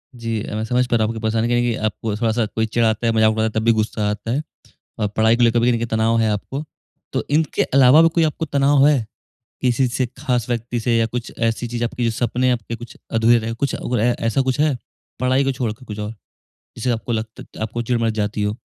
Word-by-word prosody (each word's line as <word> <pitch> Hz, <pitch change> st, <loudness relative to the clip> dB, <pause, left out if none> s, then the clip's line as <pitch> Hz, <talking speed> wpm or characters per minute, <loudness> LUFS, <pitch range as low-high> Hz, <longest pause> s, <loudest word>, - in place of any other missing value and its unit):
जी। 115 Hz, -2 st, -3 dB
अ, 105 Hz, -, -5 dB
मैं 110 Hz, -, -2 dB
समझ 125 Hz, +2 st, +1 dB
पा 120 Hz, -, +2 dB
रहा 110 Hz, -2 st, +2 dB
हूँ 115 Hz, -, -2 dB
आपकी 110 Hz, -, -6 dB
परेशानी 110 Hz, +1 st, 0 dB
कहीं 120 Hz, 0 st, +2 dB
न 120 Hz, -, +3 dB
कहीं 120 Hz, -2 st, 0 dB
आपको 110 Hz, 0 st, -2 dB
थोड़ा 115 Hz, -1 st, +1 dB
सा 115 Hz, 0 st, +1 dB
कोई 110 Hz, +1 st, -1 dB
चिढ़ाता 110 Hz, 0 st, +1 dB
है, 115 Hz, -, +2 dB
मज़ाक 110 Hz, -1 st, +4 dB
उड़ाता 110 Hz, 0 st, 0 dB
है 110 Hz, -, +1 dB
तब -, -, -3 dB
भी 115 Hz, -, +6 dB
गुस्सा 105 Hz, -1 st, -1 dB
आता 105 Hz, +2 st, -3 dB
है। 140 Hz, -, 0 dB, 0.6 s
और 105 Hz, -, +1 dB
पढ़ाई 110 Hz, +2 st, +3 dB
को 120 Hz, -, +3 dB
लेकर 120 Hz, 0 st, +4 dB
भी 120 Hz, +1 st, +3 dB
देखिए 115 Hz, 0 st, 0 dB
तनाव 110 Hz, +1 st, +1 dB
है 110 Hz, -1 st, +2 dB
आपको। 135 Hz, +8 st, -4 dB, 0.5 s
तो -, -, 0 dB
इनके 155 Hz, -1 st, +2 dB
अलावा 135 Hz, +3 st, +6 dB
भी 165 Hz, -, +5 dB
कोई 165 Hz, -, +4 dB
आपको 155 Hz, +1 st, -1 dB
तनाव 140 Hz, -1 st, +3 dB
है? 135 Hz, -7 st, +2 dB, 0.6 s
किसी 125 Hz, +1 st, +2 dB
से 125 Hz, +1 st, -1 dB
ख़ास 125 Hz, -4 st, -1 dB
व्यक्ति 120 Hz, 0 st, -2 dB
से 115 Hz, +1 st, +1 dB
या 115 Hz, 0 st, +3 dB
कुछ 120 Hz, +1 st, -5 dB
ऐसी 115 Hz, +1 st, 0 dB
चीज़ 120 Hz, 0 st, -2 dB
आपकी 120 Hz, +1 st, -2 dB
जो 115 Hz, -, +2 dB
सपने 120 Hz, +3 st, 0 dB
आपके 115 Hz, -1 st, -2 dB
कुछ 120 Hz, +1 st, -11 dB
अधूरे 115 Hz, +1 st, +4 dB
रहे 115 Hz, 0 st, -4 dB
हों। 115 Hz, -, -5 dB
कुछ 140 Hz, -, 0 dB
और 120 Hz, -3 st, -2 dB
है, 120 Hz, +2 st, +2 dB
ऐसा 115 Hz, +3 st, +1 dB
कुछ 130 Hz, +2 st, -1 dB
है? 150 Hz, -3 st, +2 dB, 0.4 s
पढ़ाई 130 Hz, +2 st, +2 dB
को 135 Hz, -, +1 dB
छोड़ 125 Hz, -4 st, -2 dB
के 120 Hz, +4 st, -15 dB
कुछ 105 Hz, -3 st, -7 dB
और 105 Hz, 0 st, -3 dB, 0.7 s
जिससे 125 Hz, +2 st, -1 dB
आपको 120 Hz, 0 st, -2 dB
लगत 110 Hz, 0 st, -4 dB, 0.2 s
त -, -, -9 dB
आपको 115 Hz, +2 st, -3 dB
चिढ़ 120 Hz, 0 st, 0 dB
मच 115 Hz, -1 st, +1 dB
जाती 105 Hz, 0 st, -1 dB
हो? 105 Hz, +2 st, -1 dB
115 Hz, 260 wpm, -20 LUFS, 110-125 Hz, 0.7 s, भी